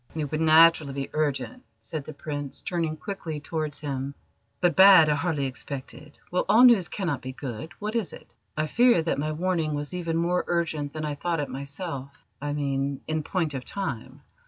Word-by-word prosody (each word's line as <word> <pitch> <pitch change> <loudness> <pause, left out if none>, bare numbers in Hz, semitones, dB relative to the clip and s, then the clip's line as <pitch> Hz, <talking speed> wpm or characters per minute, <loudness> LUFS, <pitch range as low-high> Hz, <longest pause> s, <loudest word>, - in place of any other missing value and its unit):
"It 150 -3 -3
would 155 0 -1
naturally 160 -2 +6
be 135 0 -4
urgent," 155 - -2 0.2
said 155 -4 -6
the 155 - -8
Prince, 145 -1 -5
turning 165 -4 -2
quickly 170 -5 -5
towards 155 -1 -4
him, 140 -1 -4 0.4
"but 175 -3 +2
bad 190 -4 +9
I - - +4
hardly 150 -1 -1
expected. 140 +2 -7
Well, 180 - +1
all 220 +4 +7
news 235 -8 +7
cannot 170 -9 -2
be 130 0 -6
good. 135 +4 -6
What 215 +2 -4
is 220 -8 -1
it?" - - -13 0.2
"I 155 - +1
fear 235 +1 +4
that 160 - -1
my 155 +2 -1
warning 160 -2 -1
was 145 +2 -4
even 170 -2 -2
more 175 +2 +1
urgent 160 -4 -1
than 155 0 -4
I 150 - -2
thought 165 +3 -2
it 145 - -2
myself 140 0 -6 0.2
I 145 0 -2
mean, 140 -1 -1
in 155 0 -1
point 160 -1 -1
of 130 -2 -4
time. 190 - -5
155 Hz, 190 wpm, -26 LUFS, 140-175 Hz, 0.4 s, bad